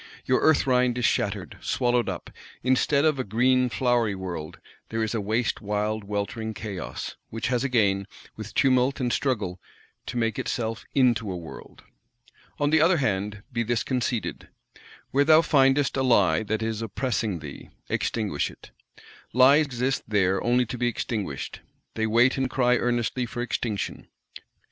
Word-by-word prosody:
Your 130 - +2
"Earth 160 -1 +4
rind" 125 -2 +2
is 125 - 0
shattered, - - -1
swallowed 120 -1 +1
up; - - -6 0.3
instead 135 +3 +2
of 155 -3 +2
a - - 0
green 125 +4 +2
flowery 120 -4 +1
world, 85 -5 -6 0.3
there 115 0 -1
is 110 - -2
a 115 - -1
waste 110 +4 -1
wild 105 +1 -2
weltering 105 +2 -3
chaos:—which 105 +2 -6
has 125 -1 +1
again, 100 -7 +1 0.3
with 110 0 -9
tumult 130 +1 +3
and 125 -2 0
struggle, 100 -10 -1 0.5
to - - -4
make 115 -2 0
itself 115 -1 -3
into 120 -6 +3
a 90 - -4
world. 85 -2 -11 0.8
On 145 0 +1
the 160 -1 +5
other 170 +2 +4
hand, 105 -5 -1
be 115 - 0
this 115 0 0
conceded: 125 -3 -2 0.6
Where 140 +2 +4
thou 155 +2 +6
findest 135 -2 +3
a 135 - +1
Lie 100 -11 +3
that 110 +1 -1
is 110 -1 -2
oppressing 115 -2 -2
thee, 75 -3 -10 0.2
extinguish 105 -10 -1
it. - - -15 0.6
Lies 140 +5 +6
exist 130 0 -1
there 95 -3 +1
only 125 +1 +3
to 120 +1 -6
be 120 - +1
extinguished; 105 - -3 0.3
they 110 0 -1
wait 120 +4 +3
and 130 -1 0
cry 125 -1 +2
earnestly 120 +1 -1
for 120 +1 -4
extinction. 110 -4 -3
120 Hz, 155 wpm, -26 LUFS, 105-130 Hz, 0.8 s, thou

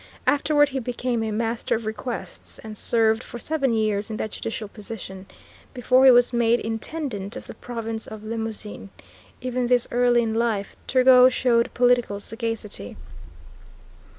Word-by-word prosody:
Afterward 290 0 +3
he 270 -1 -3
became 245 -1 -2
a 220 - -1
Master 225 +2 -1
of 225 0 -5
Requests, 220 +3 -5
and 215 -1 -8
served 225 +1 +2
for 240 - -8
seven 275 0 -1
years 215 -1 0
in 215 - -4
that 215 - -3
judicial 225 -1 -5
position, 200 -2 -9 0.5
before 255 +2 +4
he - - +10
was 245 0 +5
made 235 0 +3
Intendant 225 -2 -4
of - - -8
the - - -9
Province 225 -2 -6
of 215 -1 -9
Limousin. 220 -2 -5 0.5
Even 250 -1 -1
thus 245 -1 +2
early 245 0 +3
in 220 -1 -1
life 225 -3 -1
Turgot 255 0 +6
showed 235 -2 +2
political 245 -4 +2
sagacity. 225 - -5
230 Hz, 150 wpm, -24 LUFS, 220-245 Hz, 0.5 s, he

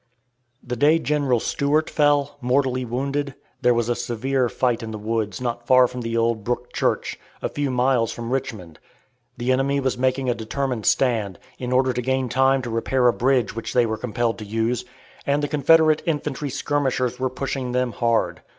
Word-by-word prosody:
The 125 0 -4
day 150 +6 +4
General 145 -6 +1
Stuart 145 +6 0
fell, 145 -1 +1
mortally 130 0 +1
wounded, 140 +3 -2 0.3
there 125 -1 +4
was 115 -1 0
a 120 - +2
severe 125 +2 -1
fight 120 -1 0
in 115 - -6
the 110 - -5
woods 105 -2 -2
not 120 -1 -4
far 130 -1 +6
from 125 0 -7
the 115 0 -2
old 115 -2 +1
Brook 120 +2 -3
Church, - - -1 0.2
a - - -2
few 145 -1 -2
miles 125 -2 +2
from 120 0 -6
Richmond; 110 -11 -4 0.6
the 120 +2 0
enemy 135 +2 +1
was 130 -2 -1
making 130 +1 +1
a 120 - +2
determined 120 +1 -3
stand, 110 -8 +1 0.2
in 125 -1 -4
order 130 0 +3
to 125 - -2
gain 130 0 0
time 135 +1 +3
to 120 - -4
repair 125 +2 +1
a 120 - +4
bridge 125 -3 +1
which 115 - -5
they 120 -1 +4
were 110 -1 -1
compelled 115 +1 -2
to - - -6
use, 115 +3 -1 0.4
and 145 +1 +1
the - - +1
Confederate 155 +2 +4
infantry 150 -2 -2
skirmishers 135 -3 -1
were 130 0 0
pushing 130 -1 -3
them 125 0 0
hard. 115 0 0
125 Hz, 185 wpm, -23 LUFS, 115-135 Hz, 0.6 s, far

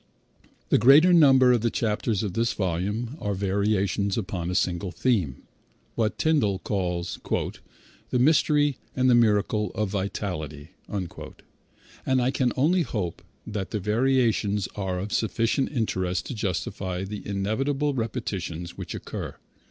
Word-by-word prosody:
The - - +4
greater 145 - +7
number 135 -6 +6
of 120 -3 +3
the 115 - +2
chapters 110 -2 -1
of 100 -4 -3
this 115 +3 +1
volume 105 - -2
are 105 -1 -2
variations 100 0 0
upon 95 -5 -3
a 90 - -2
single 90 0 0
theme, 90 - 0 0.5
what 110 -2 -1
Tyndall 140 -12 +2
called 90 -3 -2 0.9
"the - - +1
mystery 145 +1 +3 0.2
and 130 -1 +3
the - - +6
miracle 105 -3 +2
of 105 -2 -1
vitality," 90 -6 -4 0.2
and 105 +6 -6
I 125 +1 +2
can 125 -3 +1
only 170 +7 +3
hope 100 - -3 0.2
that 105 -3 -4
the 105 - -2
variations 110 -2 +1
are 95 -3 -2
of 100 +3 -4
sufficient 115 +4 +1
interest 95 -8 -1
to - - -5
justify 95 -2 -3
the 105 +1 -6
inevitable 135 +9 0
repetitions 90 -8 -4
which - - -5
occur. - - -6
105 Hz, 135 wpm, -26 LUFS, 95-125 Hz, 0.9 s, greater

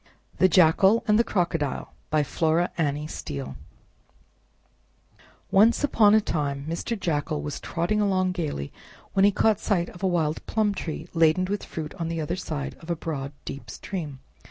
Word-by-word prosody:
THE 185 - +6
JACKAL 185 +6 +5
AND 210 +1 +4
THE - - +5
CROCODILE 170 - -1 0.2
By 150 0 +2
Flora 160 +4 +1
Annie 150 -2 -1
Steel 70 - -6 2.0
Once 215 +7 +5
upon 215 -7 +5
a - - +7
time 140 -8 -2
Mr. 170 +7 -3
Jackal 155 -4 -1
was 150 - -4
trotting 175 +5 -1
along 185 -2 +2
gayly, 155 - -4 0.4
when 195 0 +4
lie - - +7
caught 210 +1 +2
sight 175 -6 0
of 175 - -13
a 190 - +2
wild 160 -4 0
plum 215 -2 +1
tree 160 -3 -5
laden 165 +2 +4
with 200 +2 -3
fruit 155 -2 -6
on 165 - -2
the 165 0 -3
other 160 +3 -2
side 155 -6 -4
of 165 - -13
a 170 - +1
broad, 145 -4 -4
deep 140 - -7
stream. 150 -9 -6
170 Hz, 165 wpm, -26 LUFS, 150-195 Hz, 2.0 s, a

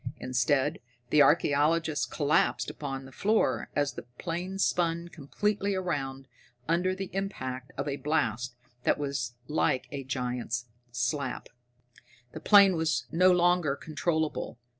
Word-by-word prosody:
Instead, 130 +4 +1 0.3
the 150 - +6
archaeologist 155 +1 +3
collapsed 150 0 +1
upon 135 -2 -5
the 135 - -12
floor 210 - +1
as 145 -1 +1
the - - -6 0.2
plane 180 +3 -4
spun 170 -3 +1
completely 200 +6 -1
around 135 -7 -3 0.4
under 180 +3 +1
the 190 0 -6
impact 130 -10 -4
of 140 - -2
a 140 -1 -2
blast 125 -5 -1 0.3
that - - +2
was 140 -5 -3
like 150 -4 +1
a 140 -1 -4
giant's 125 -2 -3 0.3
slap. 120 +4 -2 0.8
The 155 - -7
plane 195 +2 +7
was 155 -7 0
no 185 +3 +5
longer 175 -4 +3
controllable. 155 -2 -2
150 Hz, 125 wpm, -29 LUFS, 135-175 Hz, 0.8 s, plane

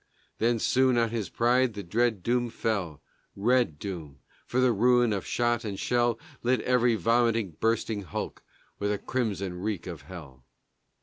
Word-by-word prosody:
Then 115 +1 +2
soon 130 +2 +3
on 115 -1 +2
his 115 -4 -3
pride 120 0 +2
the 100 - -5
dread 110 +1 0
doom 120 0 +1
fell, 100 -10 -3 0.3
Red 120 -5 +2
doom, 80 -7 -7 0.3
for 125 - 0
the 130 -1 +4
ruin 120 +1 +3
of 100 - -3
shot 120 -1 +1
and 100 -3 -4
shell 120 -1 +1 0.2
Lit 125 +1 +2
every 125 -2 +3
vomiting, 115 -1 +2
bursting 115 -2 0
hulk 90 -7 -5 0.4
With 100 0 0
a 105 - 0
crimson 100 -6 -2
reek 100 -4 -3
of 85 -4 -7
hell. 75 -9 -11
115 Hz, 160 wpm, -28 LUFS, 95-120 Hz, 0.4 s, the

